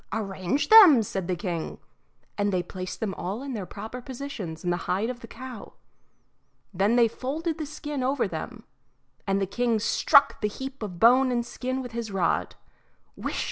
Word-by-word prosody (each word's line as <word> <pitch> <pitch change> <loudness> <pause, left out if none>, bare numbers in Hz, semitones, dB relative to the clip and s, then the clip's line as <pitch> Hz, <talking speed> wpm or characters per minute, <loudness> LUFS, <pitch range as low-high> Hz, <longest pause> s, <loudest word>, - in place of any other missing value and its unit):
"Arrange 200 +4 -2
them," 375 - +9
said 195 -3 -4
the 185 - 0
king; 170 -2 -4 0.6
and 205 0 0
they 180 -2 0
placed 185 +1 -7
them 210 -3 -1
all 195 +8 -4
in 275 -2 -5
their 200 -6 -5
proper 220 +5 -7
positions 240 - -7
in 175 - 0
the 175 0 -3
hide 200 +7 +1
of 245 - -9
the - - -11
cow. 255 -3 -9 1.0
Then 200 +5 +2
they 240 -1 +5
folded 310 +8 -3
the 310 - -3
skin 295 -1 -5
over 265 +3 +1
them, - - -6 0.6
and 195 0 +2
the 195 - +1
king 235 +4 0
struck 280 +6 +4
the 210 - +2
heap 265 +5 -7
of 185 -5 -6
bone 255 +4 +6
and 240 -1 0
skin 260 +2 -4
with 245 - -8
his 230 -1 -4
rod. 190 -4 0 0.6
Whisht! - - -4
230 Hz, 180 wpm, -26 LUFS, 195-260 Hz, 1.0 s, them